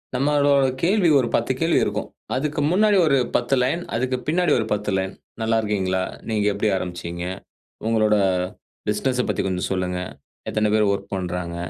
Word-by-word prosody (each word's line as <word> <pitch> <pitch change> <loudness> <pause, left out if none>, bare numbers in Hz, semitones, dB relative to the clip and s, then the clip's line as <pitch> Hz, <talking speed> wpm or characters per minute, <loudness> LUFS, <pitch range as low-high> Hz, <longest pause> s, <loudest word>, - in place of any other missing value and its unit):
நம்மளோட 140 0 +3 0.2
கேள்வி 185 -1 +3
ஒரு 125 - +1
10 - - +1
கேள்வி - - +3
இருக்கும். - - -3 0.3
அதுக்கு 150 +3 -1
முன்னாடி 210 +2 +4
ஒரு 140 -2 +4 0.2
10 125 +3 +2
லைன், 150 +8 0
அதுக்கு 130 +2 0
பின்னாடி 175 0 +2
ஒரு 110 - -1
10 105 0 -1
லைன், 95 0 -2 0.3
"நல்லா 115 0 +2
இருக்கீங்களா, 95 -3 0 0.3
நீங்க 105 -2 +1
எப்டி 105 +2 0
ஆரம்பிச்சீங்க, 85 -1 -5 0.6
உங்களோட 110 -2 +3 0.7
பிசினஸ 125 +4 0
பத்தி 105 - 0
கொஞ்சம் 90 -1 -2
சொல்லுங்க, 90 -1 -1 0.5
எத்தனை 110 0 +1
பேர் 105 -2 +3
வொர்க் 100 0 -4
பண்றாங்க, 90 -2 -3
110 Hz, 155 wpm, -23 LUFS, 95-140 Hz, 0.7 s, முன்னாடி